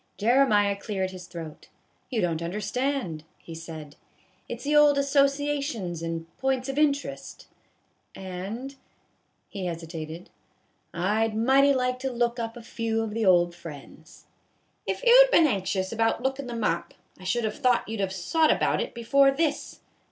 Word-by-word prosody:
Jeremiah 210 -3 +3
cleared 195 -2 -3
his 180 -1 -10
throat. 165 -3 -9 0.2
" - - -42
You 235 -4 -1
don't 165 -2 -1
under 175 +5 -3
stand," 215 - -2
he 165 - -11
said, 160 -3 -9 0.2
" - - -36
it - - -5
's - - -11
the 295 +1 +1
old 295 -1 +6
associations 275 - 0
and 165 0 -4 0.2
p'ints 265 -1 0
of 270 +2 -2
interest; 285 -2 -1 0.7
and," 195 +9 -6 0.7
he 190 -3 -5
hesitated, 165 0 -7 0.4
" - - -44
I 210 +6 +1
'd 215 - -6
mighty 270 +5 +4
like 250 0 0
to 265 0 -3
look 240 0 0
up 230 +1 -4
a 235 - -10
few 225 -1 -2
of 220 - -4
the 225 -2 0
old 175 -1 +4
friends." 160 -2 -12 0.3
" - - -39
If - - -3
you - - +8
'd - - -7
been 335 - +5
anxious 190 -6 -1
about 225 +1 0
lookin' 265 0 -2
them 235 -2 -4
up, 170 -3 -1 0.2
I - - -13
should 210 +6 0
have 220 +6 -3
thought 250 -3 +2
you 225 - -4
'd - - -2
have 190 -1 -1
sot 305 - +2
about - - +1
it - - -5
before 275 +4 +4
this. 290 +2 -2
225 Hz, 180 wpm, -26 LUFS, 180-270 Hz, 0.7 s, you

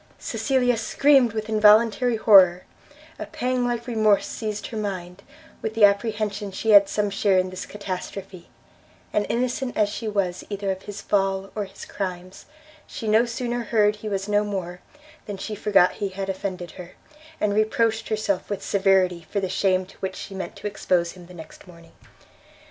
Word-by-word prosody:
Cecilia 250 -3 0
screamed 265 +1 +3
with 220 -1 -4
involuntary 220 +2 +4
horror; 190 -5 +6 0.6
a - - -5
pang 250 0 -1
like 240 -1 -2
remorse 215 -4 +2
seized 215 -2 -5
her 225 - -6
mind, 185 -3 -5 0.4
with 220 0 -4
the 220 -2 +7
apprehension 210 0 -1
she 220 +4 -1
had 200 -1 +7
some 205 -1 -1
share 200 -1 +2
in 185 0 +1
this 185 - -7
catastrophe, 195 -2 -7 0.6
and 210 - +1
innocent 250 +2 -2
as 210 -1 +3
she 220 +2 -5
was 195 -4 -1
either 200 -1 -2
of 190 0 -5
his 205 0 -8
fall 195 -1 0
or 210 -2 -3
his 195 - -11
crimes, 185 -1 -6 0.4
she 225 - -7
no 220 +3 +4
sooner 240 0 -3
heard 210 -1 +2
he 215 +1 -6
was 195 -1 -3
no 205 0 +2
more, 185 -4 -5 0.5
than 205 -2 -5
she 215 +3 -5
forgot 205 -3 +3
he 200 -2 -4
had 195 +1 -5
offended 185 -3 -4
her, 180 -1 -11 0.5
and 205 -1 +1
reproached 220 +1 +1
herself 215 -3 -1
with 205 - -4
severity 190 -4 +2
for 205 - -1
the 190 -1 -2
shame 185 -1 +1
to 190 - -18
which 190 0 -4
she 195 - -8
meant 190 -1 -6
to - - -12
expose 180 -4 0
him 180 -2 -14
the 180 - -13
next 160 +3 -12
morning. 170 -2 -16
205 Hz, 175 wpm, -24 LUFS, 190-220 Hz, 0.6 s, the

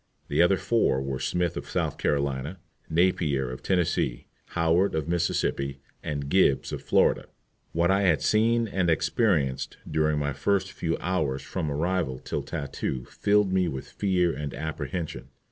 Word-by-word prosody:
The - - +3
other 90 +2 +5
four 110 - +2
were 65 -1 -3
Smith 85 +5 0
of - - -6
South - - -1
Carolina, 70 +3 -1 0.3
Napier 80 -6 +1
of 65 - -7
Tennessee, 90 -9 0 0.3
Howard 85 +3 +2
of 80 -1 -1
Mississippi, 80 -5 0 0.2
and 70 -2 -3
Gibbs 70 -4 +3
of - - -4
Florida. - - +2 0.5
What 85 +2 +2
I 100 +1 +3
had 90 -6 +3
seen 115 +2 +3
and 95 -4 0
experienced 80 - +1
during 75 -1 +1
the 70 -1 -1 0.4
few 80 -1 -1
hours 80 -7 -1
from 80 - -3
my 75 - -1
arrival 85 -4 0
till - - -4
tattoo 65 -3 -4
filled 100 -2 +2
me 95 -1 +3
with 65 -5 -5
fear 90 -4 +1
and 75 -2 -5
apprehension. 80 +3 -4
80 Hz, 150 wpm, -27 LUFS, 70-95 Hz, 0.5 s, other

